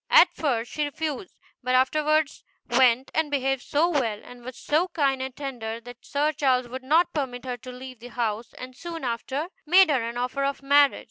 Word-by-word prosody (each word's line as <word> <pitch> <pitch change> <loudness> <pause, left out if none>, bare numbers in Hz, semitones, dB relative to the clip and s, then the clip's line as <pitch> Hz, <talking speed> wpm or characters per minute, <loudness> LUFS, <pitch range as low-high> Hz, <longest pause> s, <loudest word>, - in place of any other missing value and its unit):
At 480 -8 +7
first 245 -8 -1
she 300 - -1
refused, 305 +3 -4 0.3
but 255 0 +1
afterwards 305 +3 +2 0.2
went 250 +1 +3
and 320 -1 +1
behaved 270 -2 0
so 305 +4 +1
well, 245 -11 0
and 245 -1 -13
was 255 0 -8
so 315 +5 +1
kind 275 -6 0
and 260 -1 -5
tender, 235 -5 -5
that 245 +1 -12
Sir 295 +2 0
Charles 260 -4 +1
would 260 +2 -6
not 320 +6 +3
permit 260 -4 -3
her 250 -1 -3
to 255 +2 -10
leave 255 -1 -10
the 240 - -10
house, 235 -1 -3
and 255 0 -9
soon 330 +2 -7
after 260 +6 -3 0.2
made 360 0 +6
her 265 -4 +2
an 235 +1 -4
offer 250 +3 -1
of 275 0 -2
marriage. 285 0 +5
265 Hz, 200 wpm, -25 LUFS, 245-300 Hz, 0.3 s, At